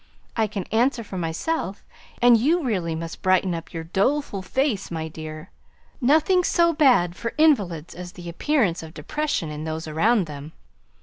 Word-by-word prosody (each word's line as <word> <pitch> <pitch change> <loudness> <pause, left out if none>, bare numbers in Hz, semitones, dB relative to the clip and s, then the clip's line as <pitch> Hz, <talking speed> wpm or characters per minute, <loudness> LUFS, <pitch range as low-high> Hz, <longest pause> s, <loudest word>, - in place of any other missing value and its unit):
I 220 -2 +2
can 200 -2 -4
answer 240 +2 +2
for 190 -3 -6
myself; 190 - -2 0.4
and 245 -1 +8
you 305 +9 +2
really 180 -10 -1
must 165 0 -6
brighten 185 -1 +2
up 165 -1 -6
your 165 -1 -5
doleful 200 - 0
face, 220 +1 -1
my 160 -1 -4
dear 155 -1 -8 0.5
nothing 315 +8 +4
so 340 -1 +3
bad 250 - +4
for 230 +3 -5
invalids 200 - +2
as 180 +1 -8
the 175 -3 -10
appearance 185 - +1
of 160 -1 -11
depression 170 - -2
in 150 0 -6
those 160 0 -4
around 195 +7 +2
them. 150 0 -9
190 Hz, 165 wpm, -24 LUFS, 165-260 Hz, 0.5 s, and